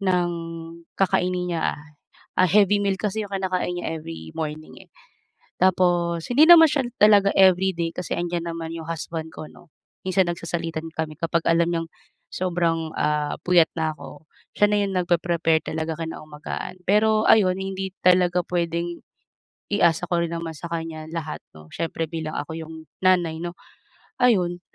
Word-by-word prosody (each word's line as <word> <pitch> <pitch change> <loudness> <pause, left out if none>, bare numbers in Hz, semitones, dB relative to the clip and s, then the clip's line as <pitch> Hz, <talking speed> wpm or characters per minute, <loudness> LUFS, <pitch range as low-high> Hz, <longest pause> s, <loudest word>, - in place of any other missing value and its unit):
ng 180 -3 +1 0.7
kakainin 180 -2 0
niya. 165 - -1 0.8
Ah, 185 - +5
heavy 205 +2 +4
meal 200 -1 +1
kasi 210 0 -2
iyong 200 - -10
kinakain 185 -2 -1
niya 165 -2 -3
every 80 - -9
morning 155 0 -6
eh. - - -45 0.7
Tapos 175 -2 +2
hindi 290 +6 +6
naman 325 -2 +9
siya 275 -3 0 0.2
talaga 205 -2 +6
everyday, 185 -2 +3
kasi 180 -1 -5
nandiyan 170 -1 -2
naman 165 -1 -5
iyong 165 -1 -7
husband 160 -1 -5
ko 155 - -8
'no, 175 -3 -19 0.3
minsan 185 -1 +2
nagsasalitan 165 -1 -4
kami 155 -1 -4
kapag 165 0 0
alam 165 0 +4
niyang 165 -1 -2 0.4
sobrang, 170 -3 -1
ah, 150 -1 0
puyat 175 -2 +5
na 160 -1 0
ako, 150 0 -12 0.3
siya 205 - +5
na 210 - +2
iyon 195 - -2
nagpre-prepare 170 -2 +1
talaga 160 0 -3
kinaumagahan, 155 0 -6
pero 215 +3 +3
ayun 185 -4 +5
hindi 190 0 -4
talaga 180 -1 +4
puwedeng 170 0 -2 0.7
i-asa 175 -3 +2
ko 170 -1 +1
rin 170 - -4
naman 165 -1 -4
sa 170 - -7
kanya 165 -1 -4
lahat 160 -2 -5
'no, 80 0 -14
siyempre 165 0 -2
bilang 160 -1 -5
ako 145 - -5
iyong 160 0 -8 0.3
nanay 175 -3 +3
'no, 175 0 -4 0.7
ayun. 180 -8 +2
170 Hz, 155 wpm, -23 LUFS, 160-185 Hz, 0.8 s, naman